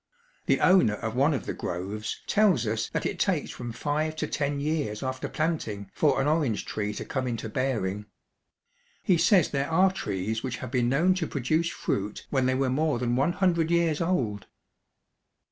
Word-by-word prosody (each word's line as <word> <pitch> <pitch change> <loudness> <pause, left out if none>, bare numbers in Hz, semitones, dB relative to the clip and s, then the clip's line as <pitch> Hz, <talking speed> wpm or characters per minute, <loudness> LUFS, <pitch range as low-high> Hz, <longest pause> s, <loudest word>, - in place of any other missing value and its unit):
The - - +2
owner 180 - +5
of 110 +1 -4
one 140 +5 +3
of 140 - -2
the - - -3
groves 100 +5 -4
tells 195 - +3
us 110 +1 -1
that - - -3
it - - -2
takes - - 0
from 120 -1 -6
five 155 +5 -2
to 155 - -2
ten 145 -1 -2
years 145 -8 -2
after 130 0 -3
planting 110 - -2
for 150 -3 +2
an 135 - +1
orange 150 -8 +1
tree 105 -1 -3
to - - -5
come 130 -2 -2
into 115 -2 -3
bearing. 105 -5 -2 1.0
He 180 -4 +3
says 185 -5 +4
there 140 +1 -1
are 185 +4 +4
trees 110 - -3
which 125 -2 -4
have - - -7
been 125 -2 +1
known 165 +8 +3
to 180 -4 -2
produce 155 +5 0
fruit 105 -10 -3
when 130 -2 +2
they 130 - +2
were 130 -1 +1
more 150 0 +1
than 120 0 0
one 140 +7 +2
hundred 170 -4 +1
years 170 -2 +2
old. 125 - -1
135 Hz, 185 wpm, -27 LUFS, 110-160 Hz, 1.0 s, owner